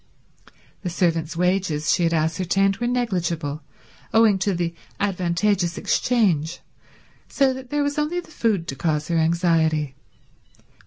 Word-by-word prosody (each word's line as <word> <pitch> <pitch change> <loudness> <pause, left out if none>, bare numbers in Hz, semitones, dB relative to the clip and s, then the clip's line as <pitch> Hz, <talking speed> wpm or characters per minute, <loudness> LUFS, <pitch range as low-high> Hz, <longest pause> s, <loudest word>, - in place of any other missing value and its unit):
The 180 - -3
servants' 165 -2 0
wages, 180 -4 +1
she - - +1
had 165 - +1
ascertained, 180 +5 +1
were 240 - -1
negligible, 170 -11 -1 0.5
owing 220 -3 +4
to 190 0 0
the 170 -1 -2 0.3
advantageous 180 -1 0
exchange, 175 -10 +1 0.7
so 270 -2 +2
that 260 -1 -9
there 290 +1 0
was 285 +1 -1
only 310 +4 0
the 350 - -11
food 215 - 0
to 135 - -3
cause 150 +2 -1
her 170 - +1
anxiety. 160 -3 +1
175 Hz, 135 wpm, -23 LUFS, 165-215 Hz, 0.7 s, owing